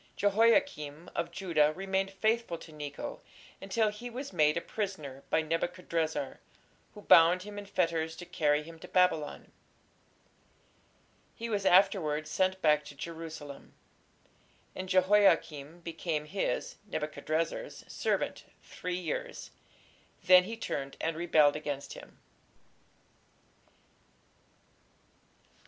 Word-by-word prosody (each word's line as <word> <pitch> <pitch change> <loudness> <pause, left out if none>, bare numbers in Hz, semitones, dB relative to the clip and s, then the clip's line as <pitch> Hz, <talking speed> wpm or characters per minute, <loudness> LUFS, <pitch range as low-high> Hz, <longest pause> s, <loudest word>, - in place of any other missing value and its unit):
" - - -36
Jehoiakim 205 - +2
of - - -1
Judah 165 -6 +2
remained 195 0 -1
faithful 220 -1 0
to 165 - -13
Necho 145 -1 -6 0.4
until 215 +3 +1
he 210 +4 -7
was 255 0 -7
made 150 -2 +3
a - - -1
prisoner 155 -12 -5
by 160 - +2
Nebuchadrezzar, 165 -3 -2 0.6
who 210 - -11
"bound 170 +2 +6
him 205 0 -7
in 200 - -9
fetters 165 -4 0
to 175 - -9
carry 150 -3 +1
him 165 +1 -12
to - - -10
Babylon". 180 -5 +1 1.8
He 230 +1 -5
was 200 -2 +1
afterwards 165 -5 +3
sent 185 +2 +1
back 150 -1 +4
to 145 - -10
Jerusalem. 160 -2 -8 1.0
"And 185 0 -5
Jehoiakim 185 -5 +3
became 165 -2 -3
his 190 +6 -2
(Nebuchadrezzar's) 160 - -3
servant - - -2 0.2
three 180 0 -4
years: 165 -4 -5 0.7
then 180 0 +7
he 225 +3 -6
turned 140 -11 -4
and 165 0 -1
rebelled 155 -3 +4
against 145 -2 -4
him." - - -13
170 Hz, 110 wpm, -31 LUFS, 155-195 Hz, 1.8 s, then